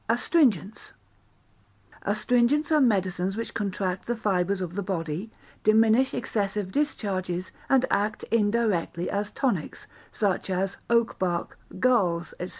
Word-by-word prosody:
Astringents 230 - +1 1.1
Astringents 245 - +1
are 305 -1 +5
medicines 190 -4 +1
which 230 - -4
contract 195 -3 -2
the 240 - 0
fibres 195 -3 0
of 180 -2 -4
the 200 - -2
body, 180 0 -3 0.3
diminish 225 +4 +4
excessive 200 -2 -2
discharges, 185 - -2 0.2
and 265 -1 +4
act 210 +2 0
indirectly 205 -6 +1
as 205 +1 -2
tonics, 240 - -2 0.3
such 200 -3 -1
as 190 +1 -1
oak 235 -1 +2
bark, 175 -2 -2 0.2
galls, 185 -9 +2
&c. 180 - -4
205 Hz, 120 wpm, -26 LUFS, 185-230 Hz, 1.1 s, are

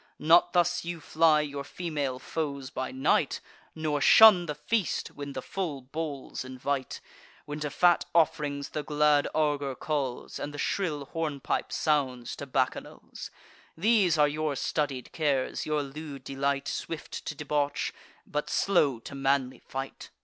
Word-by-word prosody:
Not 165 +3 +5
thus 175 0 +2
you 170 0 -5
fly 155 0 +3
your 140 -2 -4
female 145 -5 -3
foes 140 -1 -4
by 130 - -3
night, 130 +1 +1 0.4
Nor 155 -2 -1
shun 195 -3 +8
the 150 - -3
feast, 180 +7 -1
when 140 -1 -7
the 130 - -5
full 170 -8 -3
bowls 145 -1 -5
invite; 130 +1 -3 0.4
When 150 +1 -5
to 150 -1 -2
fat 175 +3 +3
off'rings 145 -3 +1
the 150 - -3
glad 150 0 +3
augur 145 -3 0
calls, 135 -3 -3
And 145 +1 -5
the - - -6
shrill 150 -3 -1
hornpipe 150 -3 -2
sounds 130 -6 0
to 140 - -7
bacchanals. 130 -1 -3 0.5
These 195 -3 +3
are 150 -1 +5
your 150 0 -1
studied 135 -2 -2
cares, 145 -5 0
your 150 -1 +1
lewd 140 -1 -8
delight: 140 +1 -1
Swift 165 -2 -5
to 150 - -4
debauch, 145 -1 -1 0.3
but 150 0 -3
slow 150 -10 +2
to 140 - -9
manly 135 -1 0
fight." 135 0 -7
145 Hz, 145 wpm, -28 LUFS, 140-155 Hz, 0.5 s, shun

